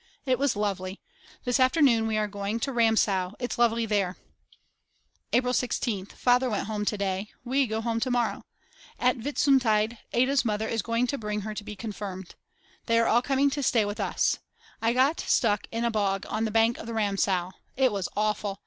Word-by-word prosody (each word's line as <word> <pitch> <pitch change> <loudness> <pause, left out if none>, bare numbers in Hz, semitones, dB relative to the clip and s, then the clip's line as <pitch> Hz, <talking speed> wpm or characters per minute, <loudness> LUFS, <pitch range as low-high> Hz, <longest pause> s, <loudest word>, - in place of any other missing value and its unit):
It 255 -2 +1
was 280 -4 +1
lovely. 195 -2 -2 0.4
This 250 0 +1
afternoon 255 -4 +4
we 220 -1 0
are 210 0 +1
going 205 +2 -3
to 275 - -2
Ramsau, 215 -5 +2
it's 245 -1 -4
lovely 230 -1 +3
there. 200 -4 0 1.1
April 250 +1 +2
16th. 220 -6 -1
Father 250 +1 +2
went 210 - -1
home 210 -1 -3
to 210 - 0
day. 195 0 -2 0.2
We 265 +2 +2
go 220 0 -2
home 230 0 -1
to 255 - -1
morrow. 245 -2 0 0.6
At 250 +1 +2
Whitsuntide 240 -5 +2
Ada's 260 +3 +2
mother 220 -1 -1
is 225 -1 -1
going 230 +3 0
to 280 +3 -3
bring 210 -1 -3
her 215 +1 -5
to 210 - -6
be 210 0 -7
confirmed. 195 -3 -6 0.5
They 230 -1 +3
are 230 - +4
all 235 - +4
coming 275 +1 +2
to 285 - -2
stay 230 -5 +2
with 205 +2 -5
us. - - 0 0.4
I 230 +1 +2
got 265 +6 +2
stuck 210 -4 +1
in 230 +1 -1
a 235 - +1
bog 195 -3 0
on 220 +1 -1
the - - -1
bank 225 +2 +3
of - - -8
the 230 - -4
Ramsau. 195 -4 0 0.3
It 260 -2 +3
was 195 -3 -2
awful. 210 -2 -1
225 Hz, 195 wpm, -27 LUFS, 205-245 Hz, 1.1 s, afternoon